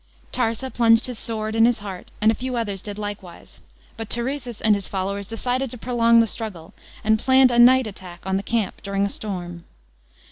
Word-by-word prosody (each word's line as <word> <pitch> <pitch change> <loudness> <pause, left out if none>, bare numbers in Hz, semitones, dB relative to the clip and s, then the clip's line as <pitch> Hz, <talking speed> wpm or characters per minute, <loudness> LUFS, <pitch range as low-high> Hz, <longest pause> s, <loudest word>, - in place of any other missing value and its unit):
Tarsa 245 +2 -1
plunged 230 -1 +4
his 250 -3 -3
sword 220 -1 -3
in 225 0 +5
his 240 0 +3
heart, 195 -3 -8
and 215 +1 +5
a - - 0
few 255 +2 -4
others 205 -5 -2
did 205 -1 -7
likewise. 205 -4 -8 0.4
But 225 -2 -6
Turesis 240 -1 -3
and 220 - +4
his 200 -2 -1
followers 200 +1 -3
decided 250 +4 -1
to 250 - -8
prolong 235 -1 +3
the - - +3
struggle, 205 -5 -5 0.3
and 220 +1 +3
pjanned 260 +1 +5
a 240 - +2
night 255 +1 +7
attack 185 -4 -9
on 190 0 -1
the 195 - 0
camp 225 -1 -2
during 200 0 -1
a - - -1
storm. 175 -5 -5
220 Hz, 200 wpm, -22 LUFS, 200-240 Hz, 0.4 s, night